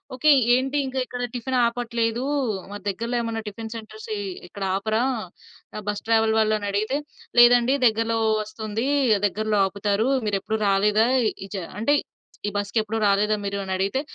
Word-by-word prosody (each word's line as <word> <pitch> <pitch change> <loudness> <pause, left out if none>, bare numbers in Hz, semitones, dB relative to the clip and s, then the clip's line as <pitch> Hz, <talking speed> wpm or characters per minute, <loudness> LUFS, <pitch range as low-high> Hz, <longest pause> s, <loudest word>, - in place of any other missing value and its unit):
Okay. 280 +4 +2 0.3
ఏంటి 265 +3 0
ఇంకా 265 0 -3
ఇక్కడ 245 0 -5
టిఫిన్ 255 +1 -3
ఆపట్లేదు 235 -1 -1 0.5
మా - - -6
దగ్గరలో 230 +5 -2
ఏమన్నా 230 -1 -3
టిఫిన్ 220 +2 -7
సెంటర్స్ 220 -1 -9 0.4
ఇక్కడ 195 +2 -7
ఆపరా! 220 +3 0 0.9
బస్ 205 0 -2
ట్రావెల్ 225 -1 +3
వాళ్ళు 215 0 +3
అనడిగితే. 205 +6 -1 0.4
లేదండి 240 +1 +6
దగ్గరలో 225 0 +2 0.2
వస్తుంది, 215 +2 -4 0.4
దగ్గరలో 215 +1 0
ఆపుతారు. 200 +3 0 0.2
మీరెప్పుడు 205 +2 -1
రాలేదా? 210 +3 +3 0.4
ఇజ 200 - -8 0.2
అంటే 285 +7 +3 0.5
ఈ - - +1
బస్‌కెప్పుడు 215 +2 -1
రాలేదా 205 +2 +2
మీరు 200 0 -2
అని 190 -1 -3
అడిగితే. 200 +8 0
220 Hz, 135 wpm, -24 LUFS, 205-235 Hz, 0.9 s, లేదండి